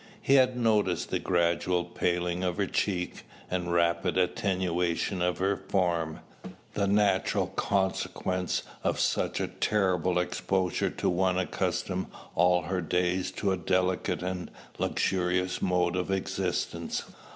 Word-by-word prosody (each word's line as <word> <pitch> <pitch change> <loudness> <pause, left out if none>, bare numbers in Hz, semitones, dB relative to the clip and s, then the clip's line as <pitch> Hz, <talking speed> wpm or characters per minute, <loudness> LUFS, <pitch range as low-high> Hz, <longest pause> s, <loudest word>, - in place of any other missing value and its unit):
He 135 - +2
had 130 -2 +5
noticed 105 -6 +1
the - - +1
gradual 85 0 +1
paling 90 0 -1
of 90 0 -1
her 100 - +2
cheek, 90 -2 -2 0.3
and 90 -1 -1
rapid 85 +1 +2
attenuation 90 -1 0
of 90 0 +1
her 95 +2 +1
form, 85 -5 -1 0.5
the 100 -1 +1
natural 100 -2 +2
consequence 95 -2 -1 0.2
of - - 0
such - - +1
a - - 0
terrible 90 -4 +1
exposure 90 0 0
to - - -3
one 90 +1 +2
accustomed 95 0 -1 0.3
all 90 0 +3
her 90 +2 -1
days 90 +2 0
to 100 +1 0
a 95 - +1
delicate 90 +1 0
and 90 -1 -3 0.3
luxurious 90 0 0
mode 90 -1 +1
of 90 0 -1
existence. 95 -1 -2
90 Hz, 130 wpm, -29 LUFS, 90-95 Hz, 0.5 s, had